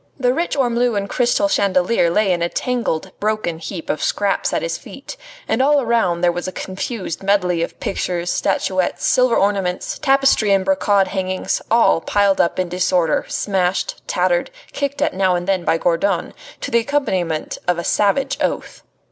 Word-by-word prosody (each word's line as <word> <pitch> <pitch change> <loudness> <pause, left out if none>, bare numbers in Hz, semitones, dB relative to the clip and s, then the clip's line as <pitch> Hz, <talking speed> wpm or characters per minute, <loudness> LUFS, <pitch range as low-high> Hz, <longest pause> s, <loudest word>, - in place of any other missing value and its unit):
The 250 -1 +2
rich 330 +1 -2
ormolu 240 -3 +1
and 200 0 -2
crystal 245 +7 +1
chandelier 190 - +2
lay 200 +2 +2
in 170 - -2
a 170 - 0
tangled, 230 -9 -2
broken 210 -6 -1
heap 165 0 -7
of 155 - -2
scraps 200 -1 0
at - - -1
his - - -2
feet, - - -10 0.3
and - - +1
all 290 +2 +4
around 225 -9 +1
there 175 -1 +3
was 175 +1 -4
a - - -3
confused 190 -1 -5
medley 185 -4 +1
of 170 - -4
pictures, 175 -2 -2
statuettes, 185 -2 -1
silver 255 -2 +3
ornaments, 195 -3 0
tapestry 270 -7 +3
and 195 -1 +2
brocade 195 0 +2
hangings, 185 -1 -2
all 230 -7 +4
piled 200 +1 +2
up 170 - 0
in 185 - 0
disorder, 180 -2 +1
smashed, 190 -2 -1
tattered, - - +1 0.2
kicked 280 0 -2
at - - 0
now 185 -1 +2
and 175 +1 -3
again 190 -2 +1
by 165 - +2
Gourdon, 175 +4 0 0.3
to 280 - -4
the 235 - +4
accompaniment 190 - -2
of 180 -1 +2
a 170 - -3
savage 210 +9 +1
oath. - - -3
195 Hz, 175 wpm, -19 LUFS, 180-235 Hz, 0.3 s, all